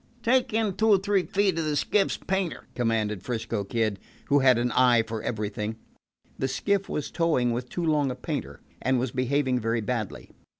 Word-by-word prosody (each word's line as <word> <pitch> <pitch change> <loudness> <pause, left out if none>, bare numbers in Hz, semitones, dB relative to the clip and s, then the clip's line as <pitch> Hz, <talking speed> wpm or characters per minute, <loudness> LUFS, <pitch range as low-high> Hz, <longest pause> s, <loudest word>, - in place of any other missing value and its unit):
"Take 255 +2 +3
in 215 -2 +1
two 220 - +2
or 205 - +7
three 200 0 +1
feet 195 -3 +1
on 160 - -1
the 150 -1 0
skiff's 195 +7 +1
painter," 190 -3 -2
commanded 110 -4 0
'Frisco 115 -2 -3
Kid, 110 -1 -1 0.3
who 145 - +5
had 130 -3 +5
an 120 +1 0
eye 120 -3 +4
for 110 -1 -5
everything. 105 -1 -3 0.6
The 135 - +1
skiff 200 +8 0
was 150 - -3
towing 155 -8 +1
with 120 +1 -3
too 175 - -3
long 150 -3 +2
a 125 - -3
painter, 125 - -5 0.2
and 130 0 +2
was 125 0 -1
behaving 130 0 +1
very 115 0 0
badly. 110 -2 -4
130 Hz, 185 wpm, -26 LUFS, 115-165 Hz, 0.6 s, or